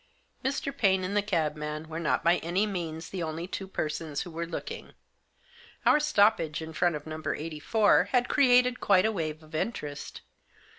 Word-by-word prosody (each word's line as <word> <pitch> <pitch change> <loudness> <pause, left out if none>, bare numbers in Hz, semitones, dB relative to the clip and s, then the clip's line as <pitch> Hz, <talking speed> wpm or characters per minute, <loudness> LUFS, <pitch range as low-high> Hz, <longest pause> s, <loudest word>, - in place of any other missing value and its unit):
Mr. 280 +1 -2
Paine 190 -4 +3
and 190 +2 -2
the 205 - +4
cabman 155 -5 -2
were 160 +1 -5
not 170 - 0
by 170 +2 +4
any 180 +5 0
means 165 -5 -4
the 185 - -4
only 160 +1 -3
two 195 0 -5
persons 155 -4 -3
who 175 - -9
were 165 +1 -4
looking. 455 - -6 0.9
Our 300 - +6
stoppage 210 - +3
in 160 0 -7
front 175 +1 +1
of 150 - -7
No. 155 0 -6
84 165 +7 +2
had 250 -1 +1
created 250 -3 +4
quite 190 -1 +4
a 220 - +2
wave 160 -5 -4
of 155 - -18
interest. 150 -5 -4
170 Hz, 175 wpm, -28 LUFS, 155-210 Hz, 0.9 s, Our